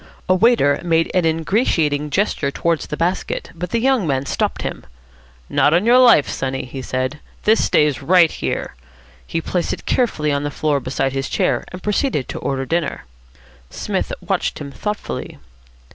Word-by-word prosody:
A 185 - +4
waiter 185 -8 +3
made 165 -1 +1
an 180 -2 +2
ingratiating 160 - +1
gesture 155 -4 0
towards 165 +3 -1
the 150 - -5
basket, 175 +1 -2
but 175 +2 -5
the 235 - 0
young 250 -5 +2
man 135 -1 0
stopped - - -1
him. - - -5 0.6
"Not 150 - +3
on 180 +5 +2
your 245 +2 +6
life, 240 - +6
sonny," 135 -1 -3
he 130 +1 -7
said. 130 +3 -3 0.2
"This 220 +1 +4
stays 150 -3 +2
right 170 +2 +5
here." - - -3 0.5
He 165 - -2
placed 175 +1 -1
it - - -8
carefully 155 - +1
on 140 0 0
the 145 - -1
floor 145 -1 0
beside 135 0 -2
his 135 0 -2
chair, - - 0
and 180 0 -9
proceeded 210 - 0
to - - -5
order 135 -1 -2
dinner. 165 0 -2 0.6
Psmith - - -3 0.2
watched - - -1
him 140 -1 -7
thoughtfully. 210 +7 -5
160 Hz, 170 wpm, -20 LUFS, 140-185 Hz, 0.6 s, your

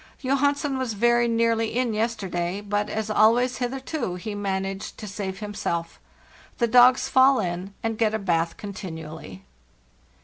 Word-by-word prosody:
Johansen 280 +1 +1
was 255 -4 -2
very 240 +3 +3
nearly 230 0 +1
in 250 -3 +1
yesterday, 195 -5 -2
but, 205 0 -2
as 220 0 -3
always 240 +4 +3
hitherto, 260 - -3
he 205 +4 -5
managed 195 -1 -3
to 215 - -8
save 195 0 -5
himself. 205 -5 -3 0.6
The 235 - +2
dogs 250 +2 +6
fall 265 0 +5
in 180 +3 -4
and 225 -1 -2
get 220 -1 +2
a - - +1
bath 170 -5 0
contin 195 -4 -7
ually. 155 -13 -9
215 Hz, 145 wpm, -25 LUFS, 190-240 Hz, 0.6 s, dogs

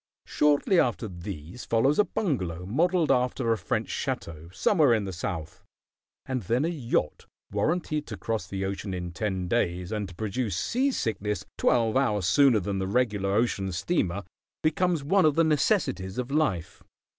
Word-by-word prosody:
Shortly 150 +5 +3
after 120 -4 +1
these 90 +1 -8
follows 130 - +2
a - - +7
bungalow 90 - -2
modelled 165 - +2
after 125 -1 +1
a - - -2
French - - -2
château, 80 +1 -4
somewhere 145 - +3
in 105 -2 -1
the 95 - -5
South, 85 -2 -5 0.6
and 130 -2 -2
then 120 - 0
a - - 0
yacht 140 -9 -2 0.2
warranted 150 - -1
to 105 - -6
cross 110 -2 -3
the 95 +1 -3
ocean 95 0 -4
in 90 -1 -4
ten 95 -1 -2
days, 90 -3 0
and 105 -3 -2
to 90 - -12
produce 105 0 -2
sea 260 - +1
sickness 105 - -2
twelve 115 -2 +2
hours 105 -8 +1
sooner 125 +5 +5
than 100 0 -2
the 95 - -1
regular 105 -3 +1
ocean 105 -4 0
steamer, 100 - -1 0.4
becomes 170 0 +1
one 190 +6 +3
of 155 -2 +4
the 165 - +4
necessities 140 - +1
of 125 +1 -3
life. 140 - -1
110 Hz, 165 wpm, -27 LUFS, 95-145 Hz, 0.6 s, a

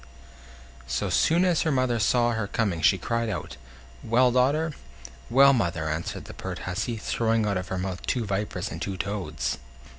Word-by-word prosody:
So 70 - -1
soon 170 +3 +3
as 175 -3 +2
her 160 - +1
mother 130 -3 +1
saw 120 +3 +3
her 110 -3 -2
coming 100 -7 -1
she 90 +5 +5
cried 115 +4 -1
out: 100 - -5 0.5
"Well, 125 +2 +4
daughter?" 145 +6 +2 0.6
"Well, 140 +2 +7
mother?" 85 -9 0
answered 80 +2 -4
the - - -9
pert - - -6
hussy, 110 +6 -2
throwing 115 +1 0
out 100 -1 0
of 95 0 -4
her 95 - -3
mouth 95 0 -4
two 120 -3 0
vipers 100 -1 -3
and - - -7
two 95 -1 -3
toads. 80 -12 -3
110 Hz, 175 wpm, -26 LUFS, 95-125 Hz, 0.6 s, Well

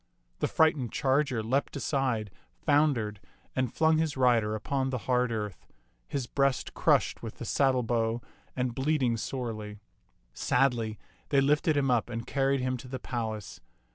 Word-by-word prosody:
The - - +1
frightened 155 -7 +2
charger 135 -4 +1
leaped 130 +6 0
aside, 130 -7 -1 0.3
foun 150 -1 +4
dered, 105 -2 -3 0.4
and 130 -2 0
flung 160 0 +3
his 160 -3 -1
rider 115 -4 +3
upon 135 +5 -1
the 130 - -1
hard 125 -1 +2
earth, 105 -5 -4 0.4
his 135 -3 -2
breast 140 +1 0
crushed - - +2
with - - -7
the - - -7
saddlebow 120 -4 +1 0.4
and 125 -2 -1
bleeding 135 -2 +1
sorely. 110 -3 -4 0.6
Sadly 120 -4 +1 0.3
they 140 - +4
lifted 150 +2 +3
him 135 -2 +2
up 120 -1 +1
and 115 -1 -4
carried 135 -1 +1
him 130 0 -1
to 125 - -10
the 130 +1 -4
palace. 110 -5 -5
130 Hz, 150 wpm, -29 LUFS, 115-140 Hz, 0.6 s, foun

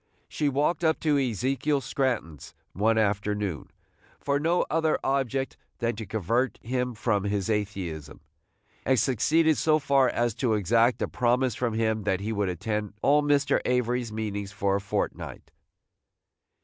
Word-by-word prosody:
She 150 -2 -1
walked 150 +5 0
up 160 -1 +2
to 150 -3 +2
Ezekiel 135 +4 0
Scranton's, 120 - -3 0.2
one 110 +3 +2
afternoon, 105 -4 -1 0.5
for 140 0 0
no 165 +4 +1
other 160 -1 +1
object 135 0 -1 0.2
than 115 -1 -1
to 110 -2 -6
convert 115 +6 0
him 125 0 -2
from 105 -2 0
his 100 0 -1
atheism, 95 -8 -4 0.6
and 130 0 +2
succeeded 155 +7 +2
so 155 -1 +3
far 135 -3 +3
as 120 -1 0
to 115 -1 0
exact 115 +4 +2
a - - 0
promise 125 0 +1
from 115 0 -2
him 110 -1 0
that 95 -3 +1
he 110 +3 -3
would 100 -2 0
attend 105 +3 -3
all 150 +1 +5
Mr. 145 -1 +2
Avery's 125 -1 0
meetings 105 -2 -4
for 100 -1 0
a - - -5
fortnight. 100 - -4
120 Hz, 150 wpm, -27 LUFS, 105-135 Hz, 0.6 s, all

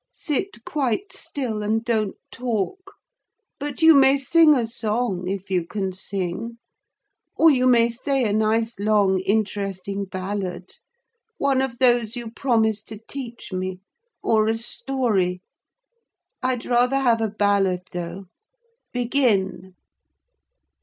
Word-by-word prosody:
Sit 295 - -3
quite 285 - -1
still 235 -7 -4
and 220 +2 0
don't 220 -4 0 0.2
talk: 245 - -3 0.6
but 290 +1 -4
you 325 0 +9
may 275 -1 +6
sing 305 +3 +5
a 245 -3 +1
song, 220 -5 -2
if 195 0 -4
you 180 -2 +2
can 190 +2 -3
sing; 195 +4 -4 0.8
or 325 0 +7
you 255 -2 +3
may 235 -2 +5
say 260 +3 -1
a 210 -3 +1
nice 220 +1 +1
long 205 -2 +3
interesting 200 -1 -2
ballad—one 205 - -4
of 260 -3 -3
those 240 -3 +3
you 235 -2 -5
promised 220 -4 0
to 215 - -7
teach 240 -6 -7
me; 185 0 -3 0.4
or 215 -1 +3
a 225 0 +1
story. 225 -7 -1 1.0
I'd 255 -2 -1
rather 250 +2 +2
have 240 -4 +2
a 220 - 0
ballad, 200 -3 +1
though: 175 +2 -5 0.7
begin." 225 -8 0
225 Hz, 120 wpm, -23 LUFS, 195-255 Hz, 1.0 s, you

